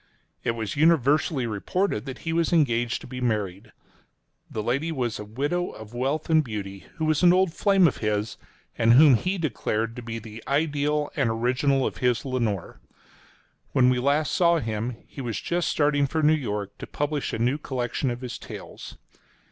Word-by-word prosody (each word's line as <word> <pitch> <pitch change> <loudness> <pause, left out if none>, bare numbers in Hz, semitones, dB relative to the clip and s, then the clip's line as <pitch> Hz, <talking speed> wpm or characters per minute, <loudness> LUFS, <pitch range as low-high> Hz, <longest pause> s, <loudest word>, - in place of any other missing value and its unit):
It 115 - 0
was 110 -3 -4
universally 150 -2 +3
reported 115 - -1
that 130 - -5
he 165 - -1
was 165 0 +1
engaged 120 -8 +2
to - - -10
be 125 0 -7
married. 105 -3 -2 0.8
The 110 - -4
lady 140 +9 0
was 125 -7 -2
a - - -5
widow, 145 +12 -2
of 110 +1 -11
wealth 135 +6 -1
and 160 -1 +4
beauty, 100 -5 -6
who 160 - -2
was 155 -1 +2
an 175 -1 +7
old 185 -2 +3
flame 195 -3 +4
of 140 - -1
his, 105 0 -2 0.4
and 115 0 +5
whom 145 +2 +8
he 185 - +1
declared 115 -8 -2
to 125 - -6
be 115 -1 -5
the 110 0 -10
ideal 150 +1 0
and 135 -5 +1
original 130 +4 +1
of - - -3
his 125 0 +1
Lenore. 115 -8 -2 0.9
When 125 -1 +5
we 125 - +1
last 145 +4 +1
saw 170 -1 +4
him, 115 -2 -3
he 135 - -9
was 120 -4 -3
just 175 0 -1
starting 145 -1 +2
for 160 +3 -1
New 155 +1 +6
York, 105 -8 -3
to - - -7
publish 145 -1 -2
a - - -2
new 125 +6 +1
collection 130 -1 -2
of 120 +1 -4
his 125 -2 -6
tales. - - -9
130 Hz, 185 wpm, -25 LUFS, 115-155 Hz, 0.9 s, whom